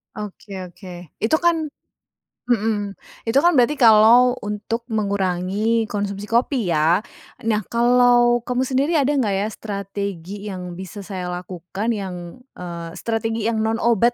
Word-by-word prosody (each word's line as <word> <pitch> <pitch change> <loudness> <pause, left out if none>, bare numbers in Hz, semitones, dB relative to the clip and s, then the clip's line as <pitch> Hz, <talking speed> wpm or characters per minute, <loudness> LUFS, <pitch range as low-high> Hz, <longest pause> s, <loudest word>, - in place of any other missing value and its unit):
Oke 210 -1 -8 0.2
oke. 180 -3 -11
Itu 230 +9 +2
kan 330 -3 +2 0.8
mhm, 215 -4 0 0.3
itu 235 +4 +3
kan 345 0 +4
berarti 250 +4 +4
kalau 235 +2 +6
untuk 215 +3 -3
mengurangi 200 +2 0
konsumsi 200 0 -3
kopi 235 -3 +1
ya, 165 +4 +3 0.4
nah 220 -1 +1
kalau 240 0 +4
kamu 250 +1 0
sendiri 270 +5 +1
ada 285 -3 +3
enggak 215 -6 +1
ya 195 +2 0
strategi 200 -2 -5
yang 180 -3 -6
bisa 190 +2 -8
saya 190 -2 -6
lakukan 180 +4 -5
yang, 185 -4 -4 0.2
eee, 170 -2 -7
strategi 225 +2 -2
yang 225 - -1
non 225 +1 -1
obat 235 +1 +3
210 Hz, 135 wpm, -21 LUFS, 190-235 Hz, 0.8 s, kalau